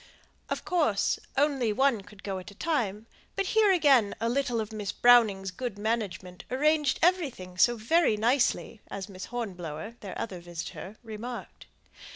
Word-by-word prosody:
Of - - -3
course 300 - +1 0.2
only 275 -5 +2
one 260 -1 +2
could 200 0 -16
go 195 -2 -3
at 185 - -10
a 200 - -14
time; 220 -7 -1 0.3
but 390 - 0
here 435 -2 +5
again 275 - +4
a 230 - 0
little 245 -2 0
of 220 0 -4
Miss 210 -2 -3
Browning's 215 -6 +4
good 235 +2 -5
management 205 -5 -3
arranged 300 +2 +2
everything 285 - +1
so 240 +6 +4
very 235 +1 +3
nicely, 235 -1 +1
as 195 0 -5
Miss 185 -1 -7
Hornblower 190 -4 -6
(their 200 -4 -7
other 190 -5 -4
visitor) 175 +4 -7
remarked. 230 +2 -8
225 Hz, 155 wpm, -28 LUFS, 195-270 Hz, 0.3 s, here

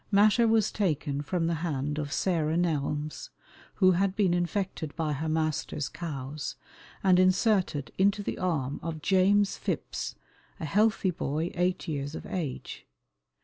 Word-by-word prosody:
Matter 215 +3 +5
was 220 -2 +3
taken 150 -7 -1
from 165 +4 -1
the 170 - +1
hand 150 -2 -2
of 145 -2 -4
Sarah 160 -1 +1
Nelmes, 150 -3 -1 0.5
who 185 -2 +5
had 190 +2 +1
been 195 -4 +3
infected 175 -3 -2
by 155 -2 -1
her 155 +3 -2
master's 155 -2 -1
cows, 145 -3 -5 0.5
and 185 -2 +5
inserted 185 - +2
into 200 +2 +3
the - - -4
arm 145 -7 -1
of 160 -2 -5
James 200 +1 +3
Phipps, - - -3 0.4
a 160 - -3
healthy 205 +3 +2
boy 160 0 -2
eight 180 +1 0
years 145 -1 -3
of - - -7
age. 155 -8 -5
170 Hz, 145 wpm, -28 LUFS, 150-190 Hz, 0.5 s, Matter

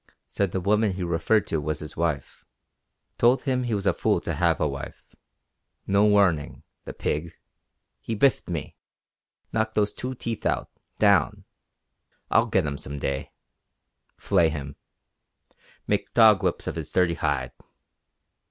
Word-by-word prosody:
Said 100 -3 -1
the 95 - -1
woman 105 +2 +2
he 90 0 -4
referred 85 +5 +1
to 80 - -2
was 75 +1 -2
his 75 0 -9
wife. 80 -4 -3 0.8
Told 120 +3 +4
him 130 -3 0
he 115 -3 -1
was 100 - -3
a - - +3
fool - - +1
to 85 - -3
have 85 +1 +1
a 75 - +2
wife. 70 0 -8 0.7
No 100 +1 +3
warning 100 -8 +2 0.2
the - - -6
pig! 80 +3 -2 0.7
He 115 - -4
biffed 125 -1 +2
me. 80 -4 -4 0.8
Knocked 110 0 -1
those 105 -1 +1
two 130 +1 -5
teeth 115 -2 -5
out - - -1 0.3
down! - - +3 0.9
I'll - - +4
get - - +1
him 70 -1 -3
some 70 +1 -6
day. 70 +1 -3 0.9
Flay 85 -2 +2
him. 70 -2 -6 1.1
Make - - -2
dog 110 -4 +7
whips - - -1
of - - -4
his 80 -2 -6
dirty 90 -2 +2
hide. 70 -6 -1
85 Hz, 150 wpm, -25 LUFS, 75-105 Hz, 1.1 s, dog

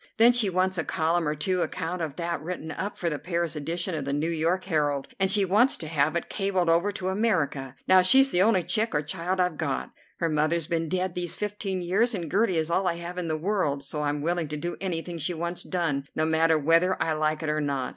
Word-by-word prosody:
Then 235 +2 +7
she 235 -5 +2
wants 185 0 0
a - - 0
column 165 +1 0
or 150 - 0
two 180 +4 0
account 175 +2 -3
of 155 -4 -3
that 170 -2 -3
written 160 -1 -5
up 195 +6 -4
for 175 - -2
the 150 -3 -1
Paris 170 -2 -2
edition 170 +5 -2
of 155 -3 -2
the 140 +1 -2
"New 155 +4 0
York 170 +3 0
Herald," 145 -6 0
and 190 0 +3
she 200 0 +4
wants 215 +8 +3
to 160 - -7
have 155 0 +1
it 170 - -2
cabled 190 -4 0
over 175 +5 +2
to 185 -2 -3
America. 165 - 0
Now 185 0 +7
she's 265 +9 +5
the 175 - +3
only 195 -3 +4
chick 215 +4 0
or 150 - +1
child 180 +4 -3
I've 180 -4 +1
got. 145 -5 -2 0.3
Her 170 - 0
mother's 155 +1 +1
been 165 0 -2
dead 185 +1 -1
these 175 -1 -3
fifteen 200 -3 -3
years, 215 +7 +1
and 170 -5 -5
Gertie 195 -3 +2
is 160 +1 -1
all 185 +2 +1
I 170 - +1
have 170 +1 -6
in 175 - -3
the 155 -1 -1
world, 155 -6 -1
so 150 +2 -4
I'm 145 0 -1
willing 170 0 0
to 150 +1 -5
do 175 +3 -4
anything 175 -2 -3
she 165 +3 -1
wants 170 +2 -3
done, 150 -7 -2
no 155 - +1
matter 160 0 +3
whether 165 +5 +3
I 160 - +1
like 155 +1 -1
it 155 - -1
or 150 0 0
not. 140 -3 -1
170 Hz, 245 wpm, -26 LUFS, 155-185 Hz, 0.3 s, Then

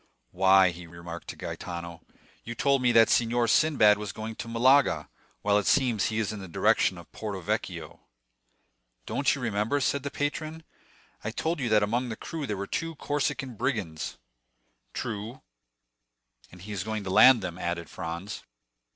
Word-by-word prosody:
"Why," 95 0 +5
he 85 0 -10
remarked 85 0 -9
to - - -6
Gaetano, 85 -1 -6 0.4
"you 120 - -6
told 140 +1 +2
me 125 -1 +3
that 115 -1 +6
Signor 120 0 +2
Sinbad 110 -4 +4
was 105 -2 -4
going 110 +3 -6
to - - -6
Malaga, 130 +4 +3 0.4
while 105 0 +3
it 100 - -3
seems 125 -7 +3
he 110 - -1
is 110 -1 -1
in 105 - -6
the 95 - -8
direction 85 - +2
of - - -13
Porto 105 -3 -5
Vecchio." 85 - -4 1.1
"Don't 140 0 +1
you 135 - -7
remember," 115 +4 0
said 140 +1 0
the 140 - -4
patron, 155 +3 -3 0.6
"I 110 - -2
told 160 +8 -2
you 125 -3 -1
that 105 -1 +4
among 120 +4 0
the 110 - -4
crew 155 +4 -5
there 105 - -2
were 100 - -3
two 165 +9 -3
Corsican 140 -3 -2
brigands?" 105 - -3 0.8
"True; 115 +2 -5 1.1
and 90 0 -13
he 105 - -8
is 100 -3 -3
going 110 -1 -3
to 95 - -4
land 120 +2 +7
them," 90 -1 -5
added 85 -1 -3
Franz. 85 +5 -6
110 Hz, 170 wpm, -28 LUFS, 95-130 Hz, 1.1 s, land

